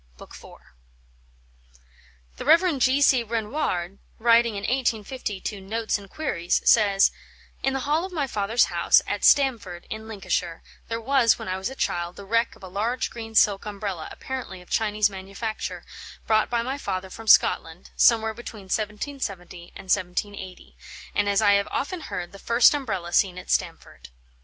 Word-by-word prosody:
B. - - -11
iv, - - -13 1.9
The - - -6
Rev. 330 0 +4
G. 265 +3 +3
C. 260 -3 +5
Renouard, 215 - -3 0.2
writing 230 -1 +4
in 200 - -5
1850 235 -3 -2
to 200 -2 -5
Notes 220 +2 -2
and 200 -1 -14
Queries, 175 - -1
says: 200 -3 +5 0.5
"In 270 - 0
the 270 - -2
hall 300 +5 0
of 380 - -6
my 310 -5 -1
father's 220 -1 +1
house, - - +4
at - - -3
Stamford, 225 -11 +3
in 220 0 -6
Lincolnshire, 180 -5 -3 0.2
there 230 0 -3
was, 245 -1 +3
when - - -8
I 185 - -1
was 190 +5 -3
a 265 - -9
child, 175 -7 -2
the 200 - -10
wreck 230 +3 0
of - - -19
a - - -7
large 220 +7 -2
green 225 -1 -8
silk 205 -1 +3
umbrella, 200 -5 -5
apparently 260 -8 -7
of 180 - -17
Chinese 210 -1 +2
manufacture, 195 +3 -6 0.4
brought 220 -1 +2
by 235 -1 0
my 265 +3 -4
father 185 -6 -4
from 225 +3 -10
Scotland, 165 -4 +3
somewhere 220 -1 +4
between 220 -2 -9
1770 210 -5 -4
and - - -9
1780, 185 0 -3 0.4
and, 205 -1 +1
as 200 +2 +2
I 205 - +5
have 200 0 +2
often 360 +6 -3
heard, 175 - -6
the 200 - -12
first 235 +6 +5
umbrella 195 -12 -3
seen 185 -2 +2
at 180 - -7
Stamford. - - -3
215 Hz, 165 wpm, -25 LUFS, 195-240 Hz, 1.9 s, C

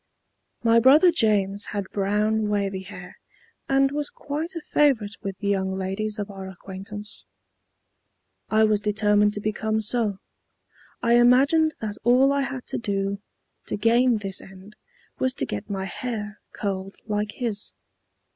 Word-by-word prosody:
My 230 0 +5
brother 295 +9 +7
James 205 - +1
had 200 -2 -4
brown 210 +2 +1
wavy 200 -2 -1
hair, 180 -2 -11 0.5
and 270 0 +3
was 295 0 -2
quite 315 +5 -5
a - - -2
favorite 250 -10 +2
with 195 -1 -5
the 200 -1 -2
young 190 -1 0
ladies 195 +3 -3
of 205 0 -4
our 195 -1 -8
acquaintance. 195 +3 -9 1.3
I 220 0 +4
was 215 -1 +3
determined 210 0 +2
to 205 - -3
become 215 +1 -1
so. 215 -2 0 0.9
I 235 0 +5
imagined 280 +6 +4
that 210 -2 -4
all 255 +4 +5
I 280 - +1
had 265 -2 -4
to - - -2
do 200 -2 -2 0.5
to - - -1
gain 235 +2 +3
this 195 -2 -3
end 195 +2 -14 0.4
was 260 0 0
to - - -1
get 105 -4 -5
my 195 -1 -3
hair 210 -1 -5
curled 195 -1 -4
like 210 -1 -2
his. 225 -5 -4
210 Hz, 145 wpm, -24 LUFS, 200-240 Hz, 1.3 s, brother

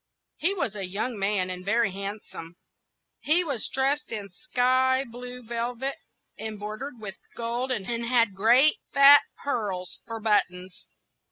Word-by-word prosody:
He 370 +6 +1
was 225 - -1
a 195 -3 -4
young 210 +4 -3
man, 195 -2 0
and 180 0 -6
very 210 +1 +1
handsome. 195 -3 -7 0.6
He 335 +4 +3
was 280 -9 -1
dressed 275 +3 0
in 205 -4 -5
sky 255 +4 +1
blue 250 +1 -8
velvet, 240 +3 -3 0.4
embroidered 220 +4 -6
with 200 -3 -7 0.2
gold, 240 +3 -2
and 210 -6 -1
had 235 -1 +1
great 240 +9 +5 0.2
fat 280 +1 +9 0.2
pearls 200 -10 -3
for 230 -1 -5
buttons. 185 -4 -1
230 Hz, 135 wpm, -26 LUFS, 200-255 Hz, 0.6 s, fat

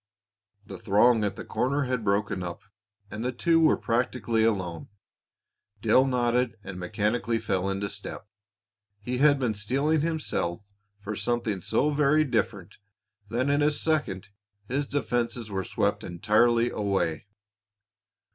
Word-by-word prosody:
The - - -9
throng 110 +2 +4
at 100 - -1
the - - -8
corner 140 +3 0
had 125 -3 -2
broken 100 -1 0
up, 85 -1 -6 0.5
and 105 +3 -5
the 125 - 0
two 165 +6 +2
were 160 -1 +4
practically 115 -1 0
alone. 95 -7 -1 0.9
Dale 130 +4 +4
nodded 120 -2 +1
and 95 -2 -7
mechanically 110 +5 -1
fell 95 -4 -1
into 100 +1 -2
step. 100 0 -7 0.7
He 125 +4 -3
had 145 0 +5
been 125 -5 0
steeling 135 +9 0
himself 150 - -2 0.4
for 105 +1 -5
something 115 -5 -1
so 150 - +1
very 150 +1 +3
different 110 - -2 0.5
that 120 +4 0
in 145 +1 +2
a 145 - +4
second 145 - -1 0.4
his 140 +4 -1
defenses 120 -5 -2
were 95 -1 -2
swept - - -1
entirely 115 +6 +2
away. 95 -4 -1
115 Hz, 135 wpm, -27 LUFS, 100-130 Hz, 0.9 s, had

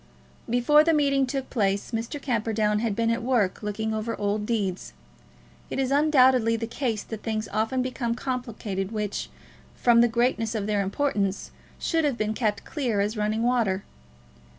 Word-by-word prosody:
Before 245 +6 +5
the 325 0 +3
meeting 275 -2 +2
took 270 +1 -4
place, 200 -4 0
Mr. 230 +5 -3
Camperdown 220 -5 0
had 220 -2 -1
been 230 +1 +1
at 230 +1 -1
work, 235 -6 +1
looking 220 +1 -2
over 220 +1 -2
old 205 +1 -1
deeds. 195 - -2 0.8
It - - -4
is 270 -1 0
undoubtedly 260 -6 +4
the 230 0 -2
case 230 -3 -2
that 220 -2 -7
things 220 -1 -2
often 225 +4 0
become 245 -2 -2
complicated 230 -7 -4
which, 210 -2 -3 0.5
from 235 -1 +4
the 240 - +5
greatness 235 -1 0
of 210 -2 -1
their 210 -1 +1
importance, 200 -2 -1 0.3
should 325 -2 0
have 285 -5 0
been 215 -1 -1
kept 215 -3 -1
clear 245 -9 -1
as 205 +3 0
running 215 +1 0
water. 225 -6 +1
230 Hz, 165 wpm, -26 LUFS, 210-255 Hz, 0.8 s, Before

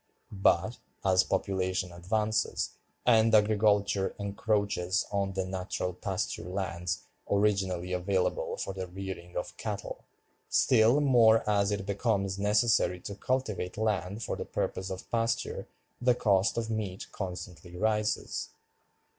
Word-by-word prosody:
But, 95 +2 +2 0.3
as 95 -1 +5
population 95 -2 -1
advances, 105 +5 0 0.3
and 115 -2 +5
agriculture 105 -2 +3
encroaches 100 -2 0
on 100 -1 0
the 95 0 -1
natural 90 -1 -3
pasture 90 -2 -3
lands 90 -3 -3 0.3
originally 95 -3 +1
available 90 +1 0
for 95 - -3
the 95 -1 -5
rearing 90 -1 -7
of 90 - -4
cattle, - - -5 0.4
still 120 +3 +4
more 115 -6 +5
as 100 -1 +3
it 100 -2 -2
becomes 100 -2 0
necessary 105 -3 +3
to 100 - -6
cultivate 105 -5 -2
land 105 -1 -1
for - - -2
the - - -4
purpose 95 +1 -3
of 95 0 -6
pasture, 115 0 -1 0.3
the 125 0 +4
cost 100 -2 +2
of 115 -1 -1
meat 100 -4 -3
constantly 90 -2 -7
rises." 105 +1 0
100 Hz, 120 wpm, -30 LUFS, 95-110 Hz, 0.4 s, as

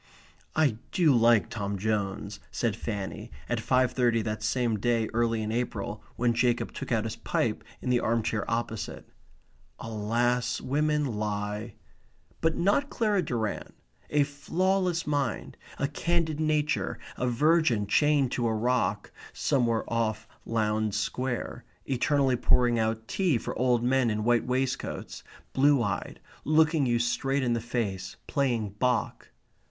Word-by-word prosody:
"I 145 -8 +3
do 160 -7 +4
like 115 -5 +5
Tom 100 -2 -3
Jones," 100 0 -2
said - - -1
Fanny, 100 -3 -5 0.2
at 120 - -1
five 130 +2 +2
thirty 120 -3 +2
that 110 0 -3
same 115 0 0
day 115 0 +1
early 115 -1 +1
in 105 - -2
April 110 -3 -3
when 120 0 +2
Jacob 120 0 +1
took 140 - -6
out 110 -2 +2
his 110 - -4
pipe - - -1 0.2
in 125 - 0
the 125 - +4
arm 115 0 +1
chair 105 -2 -1
opposite. 115 -2 -3 0.7
Alas, 115 +3 0
women 150 +2 +1
lie! 105 -1 -3 0.7
But 165 0 +2
not 205 +11 +2
Clara 210 -4 +1
Durrant. 115 - -3 0.3
A 145 -1 +3
flawless 175 +4 0
mind; 140 -5 -2 0.2
a 140 - 0
candid 160 +1 -1
nature; 150 -1 0 0.2
a 125 - -1
virgin 130 -3 +3
chained 145 +4 +3
to 120 -2 0
a 110 - +1
rock 125 +3 0 0.2
(somewhere 120 -4 +1
off 110 -1 -1 0.2
Lowndes 110 -2 0
Square) 125 -2 -3 0.2
eternally 135 0 +2
pouring 120 -1 +3
out 110 0 -1
tea 180 -9 +1
for - - -5
old 125 -1 +2
men 130 -1 +3
in 105 0 -1
white 120 +1 +2
waistcoats, 130 +1 -2 0.3
blue 140 -2 +4
eyed, 100 -2 -3 0.2
looking 155 -2 +3
you 120 -1 +2
straight 135 +3 0
in 120 -2 +1
the 115 - -1
face, 100 -6 -3
playing 120 -7 0
Bach. 125 -1 0
120 Hz, 140 wpm, -28 LUFS, 110-140 Hz, 0.7 s, like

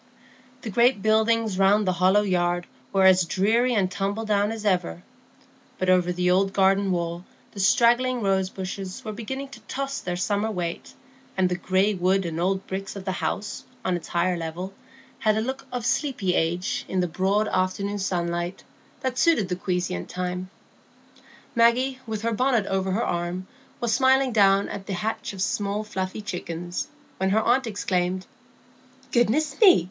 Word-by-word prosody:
The 220 - -4
great 235 0 +3
buildings 220 -2 +2
round 200 +2 +4
the 185 - +2
hollow 190 +3 +5
yard 175 -2 0 0.3
were 195 -1 +3
as 185 -1 +6
dreary 230 +8 +2
and 195 -3 +2
tumbledown 205 +2 0
as 220 -1 -6
ever, 135 - 0 0.7
but 185 0 +2
over 180 -1 +3
the 180 0 +1
old 195 +1 +2
garden 195 0 +3
wall 170 0 -2 0.3
the 200 - -10
straggling 240 +5 +3
rose 190 -1 +1
bushes 190 +1 -6
were 215 - -3
beginning 265 +5 -5
to 270 -4 -11
toss 275 0 -3
their 180 -1 -3
summer 205 +4 0
weight, 175 -5 -4 0.4
and 185 -1 +3
the 180 - 0
gray 190 +3 +1
wood 190 +1 +1
and 165 -1 -3
old 190 +2 0
bricks 195 +1 -5
of 195 -1 -7
the 190 - -1
house, 200 +2 -3 0.2
on 185 - +1
its 175 - -6
higher 175 +1 +1
level, 170 +3 -5 0.5
had 215 -1 +2
a - - +2
look 265 +4 -4
of 245 -2 -3
sleepy 245 - 0
age 175 +3 0
in 190 - -1
the 180 - +1
broad 195 +5 +1
afternoon 200 +2 -1
sunlight, 175 -1 -2 0.4
that 260 0 -2
suited 265 - +3
the 180 - 0
quiescent 180 - -2
time. 180 0 -4 1.0
Maggie, 250 +3 +3
with 220 -1 -4
her 230 0 0
bonnet 245 -2 +2
over 190 -1 -1
her 225 - 0
arm, 175 +2 -2 0.3
was 235 -2 0
smiling 265 +1 +4
down 200 -2 +4
at 195 - -7
the 200 - -3
hatch 220 +4 -3
of 190 -2 -3
small 205 +1 -1
fluffy 190 0 -4
chickens, 175 - -4 0.3
when 190 0 0
her 215 +3 +3
aunt 245 +2 +2
exclaimed,— 185 -3 -1 0.9
"Goodness 260 - +1
me! 390 -5 +8
195 Hz, 170 wpm, -25 LUFS, 185-220 Hz, 1.0 s, me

